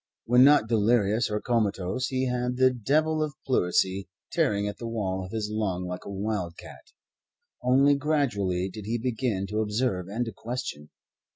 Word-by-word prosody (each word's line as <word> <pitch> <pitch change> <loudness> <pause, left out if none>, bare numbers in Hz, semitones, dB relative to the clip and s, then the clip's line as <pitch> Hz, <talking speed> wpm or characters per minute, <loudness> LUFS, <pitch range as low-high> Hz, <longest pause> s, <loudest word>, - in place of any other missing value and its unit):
When 125 +2 +6
not 145 -5 +6
delirious 110 0 +2
or 105 0 -1
comatose, 110 0 0
he 130 0 -1
had 125 0 -1
the 130 0 +5
devil 155 +7 +1
of 150 -2 -2
pleurisy 95 -5 +1 0.2
tearing 100 0 +1
at 105 - -6
the 115 - -5
wall 95 -5 -2
of 95 - -9
his 105 -1 -3
lung 95 -4 -1
like 90 0 -6
a - - -7
wild 95 -4 -3
cat. - - -12 0.8
Only 135 +3 +4
gradually 120 - 0
did 100 +1 -8
he 115 +2 0
begin 115 -4 -1
to 105 +1 -1
observe 105 -4 -1
and 115 +5 -2
to 115 - -5
question. 115 -13 -6
110 Hz, 170 wpm, -27 LUFS, 100-125 Hz, 0.8 s, When